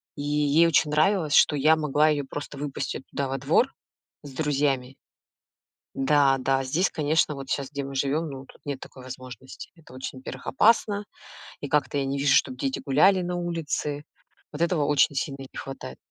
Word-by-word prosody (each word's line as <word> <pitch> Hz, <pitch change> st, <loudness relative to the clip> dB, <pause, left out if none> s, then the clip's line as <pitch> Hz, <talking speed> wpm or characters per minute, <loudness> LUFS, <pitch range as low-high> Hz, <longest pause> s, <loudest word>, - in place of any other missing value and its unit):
И -, -, -6 dB
ей 150 Hz, +2 st, +3 dB
очень 150 Hz, -2 st, +2 dB
нравилось, 155 Hz, 0 st, +2 dB
что 150 Hz, -, +5 dB
я 155 Hz, +3 st, +5 dB
могла 150 Hz, 0 st, +2 dB
ее 150 Hz, -2 st, +1 dB
просто 145 Hz, +1 st, -7 dB
выпустить 140 Hz, -2 st, -4 dB
туда 140 Hz, -, -2 dB
во 135 Hz, +1 st, -2 dB
двор 155 Hz, -, +2 dB, 0.5 s
с 145 Hz, -, -9 dB
друзьями. 135 Hz, -3 st, -1 dB, 1.0 s
Да, 135 Hz, 0 st, +3 dB
да, 135 Hz, +1 st, +1 dB
здесь, 160 Hz, +8 st, +1 dB
конечно, 155 Hz, -1 st, +1 dB
вот 135 Hz, -1 st, -8 dB
щас, 140 Hz, -2 st, -2 dB
где 140 Hz, -1 st, -4 dB
мы 135 Hz, 0 st, -7 dB
живем, 140 Hz, +4 st, 0 dB
ну, 135 Hz, -1 st, -8 dB
тут -, -, -18 dB
нет 140 Hz, -2 st, -4 dB
такой 130 Hz, -1 st, -12 dB
возможности. 130 Hz, +1 st, -10 dB
Это 160 Hz, -6 st, -17 dB
очень, 130 Hz, +1 st, -6 dB
во-первых, 130 Hz, 0 st, -9 dB
опасно, 210 Hz, -, +3 dB, 0.6 s
и 145 Hz, -, -4 dB
как-то 145 Hz, -1 st, 0 dB
я 140 Hz, -, 0 dB
не 135 Hz, +1 st, -2 dB
вижу, 140 Hz, 0 st, +4 dB
чтоб 130 Hz, -2 st, +2 dB
дети 135 Hz, +1 st, -2 dB
гуляли 185 Hz, +8 st, +4 dB
на 175 Hz, 0 st, -3 dB
улице. 160 Hz, -4 st, -3 dB, 0.5 s
Вот 150 Hz, -, -6 dB
этого 170 Hz, -4 st, +2 dB
очень 145 Hz, 0 st, +3 dB
сильно 135 Hz, 0 st, -3 dB
не -, -, -11 dB
хватает. 135 Hz, -, -7 dB
145 Hz, 185 wpm, -26 LUFS, 135-155 Hz, 1.0 s, что